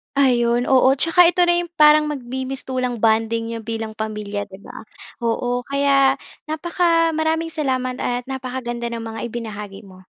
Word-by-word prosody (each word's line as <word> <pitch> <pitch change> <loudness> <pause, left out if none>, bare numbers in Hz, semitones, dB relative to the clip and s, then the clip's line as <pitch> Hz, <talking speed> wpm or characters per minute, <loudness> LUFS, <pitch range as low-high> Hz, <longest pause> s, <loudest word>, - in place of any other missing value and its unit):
Ayun. 245 -3 +2
Oo, 260 0 +5
tsaka 330 +2 +5
ito 355 - -5
na 345 0 +3
yung 340 - -11
parang 300 0 +7
magmi-mistulang 255 -2 -3
bonding 225 +1 +1
n'yo 230 -1 -6
bilang 225 -1 -5
pamilya, 210 -1 -4
'di 190 -1 -13
ba? - - -11 0.4
Oo, 245 +2 -1
kaya 275 0 +2 0.3
napaka 330 0 +1
maraming 320 +1 0
salamat 260 -5 -2
at 245 0 -3
napakaganda 250 -3 -4
ng 235 - -4
mga 225 0 -6
ibinahagi 210 -3 -7
mo. 185 0 -16
250 Hz, 145 wpm, -21 LUFS, 225-280 Hz, 0.4 s, parang